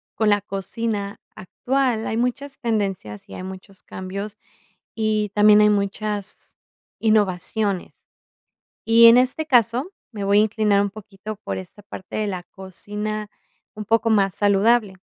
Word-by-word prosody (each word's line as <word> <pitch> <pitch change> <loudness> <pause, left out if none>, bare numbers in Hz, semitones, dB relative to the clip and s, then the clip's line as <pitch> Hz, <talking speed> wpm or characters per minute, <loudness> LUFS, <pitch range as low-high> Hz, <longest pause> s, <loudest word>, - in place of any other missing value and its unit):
con 220 -1 +2
la 205 0 +3
cocina 200 +1 -4 0.2
actual 250 +3 -1
hay 220 - -2
muchas 270 +3 -2
tendencias 195 - -3
y - - -10
hay 185 - -7
muchos 190 +1 -10
cambios, 200 +3 -6 0.6
y 215 -1 0
también 210 0 +6
hay 210 - +5
muchas 205 0 -3 0.4
innovaciones. 205 -2 0 0.8
Y 230 +1 +7
en 230 +1 +9
este 255 +5 +1
caso, 250 - +2 0.2
me 205 -3 -5
voy 200 +1 +4
a - - +5
inclinar 215 -2 +2
un 200 - -2
poquito 210 0 -9
por - - -3
esta 185 +2 -11
parte 190 -2 -9
de 215 - -1
la 185 -3 -4
cocina, 210 +3 -6 0.5
un 215 - -6
poco 225 +1 +2
más 195 -3 +2
saludable. 205 +1 +2
210 Hz, 145 wpm, -22 LUFS, 195-225 Hz, 0.8 s, en